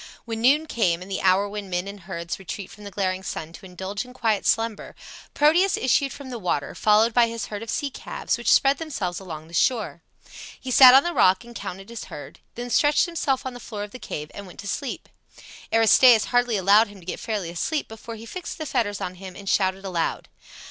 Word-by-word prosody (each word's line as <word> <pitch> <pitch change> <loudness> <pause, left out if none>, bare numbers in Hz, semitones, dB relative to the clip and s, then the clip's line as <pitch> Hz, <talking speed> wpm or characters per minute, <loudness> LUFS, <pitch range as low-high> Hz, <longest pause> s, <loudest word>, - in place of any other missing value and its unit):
When 225 -1 -4
noon 285 +6 +4
came 180 - 0
and 195 - -12
the 190 - -2
hour 190 +2 +3
when 205 -1 -6
men 180 +1 -2
and 200 0 -8
herds 170 -2 -6
retreat 190 +1 -7
from 210 - -13
the - - -6
glaring 185 -2 -2
sun 165 -3 -6
to 190 - -11
indulge 190 +3 -5
in 250 0 -14
quiet 225 -5 0
slumber, 225 -1 0 0.4
Proteus 340 +6 +4
issued 265 +2 +2
from 275 -2 -9
the 240 - -5
water, 175 -7 -2
followed 215 +2 +3
by 240 0 +5
his 230 -2 -4
herd 210 0 -6
of 230 - -8
sea 285 +3 -2
calves - - -3
which - - 0
spread 275 0 +4
themselves 200 - -3
along 160 -5 -8
the 170 - -17
shore. 215 -2 0 0.6
He 260 - -6
sat 255 0 +9
on 270 - +7
the 345 - -2
rock 185 - +4
and 235 0 -13
counted 195 -2 -7
his 235 -1 -7
herd; 145 - -10 0.2
then 245 +1 -6
stretched 290 +6 +4
himself 290 -7 -1
on 260 - -4
the 245 - -9
floor 210 -4 -6
of 205 - -8
the 255 - -10
cave 150 -8 -6
and 200 -1 -9
went 180 - -14
to 200 - -9
sleep. 270 +5 -4 0.6
Aristaeus 225 +1 +6
hardly 245 -3 +3
allowed 200 +4 +5
him 205 -1 -13
to 175 - -16
get 185 - -5
fairly 205 -7 -3
asleep 290 - -2
before 225 +1 -9
he 225 +1 -10
fixed 360 +8 -7
the 315 - -5
fetters 225 -8 -1
on 180 - -3
him 190 -2 -9
and 200 +1 -11
shouted 190 0 +1
aloud. 175 -4 -2
215 Hz, 225 wpm, -24 LUFS, 190-245 Hz, 0.6 s, sat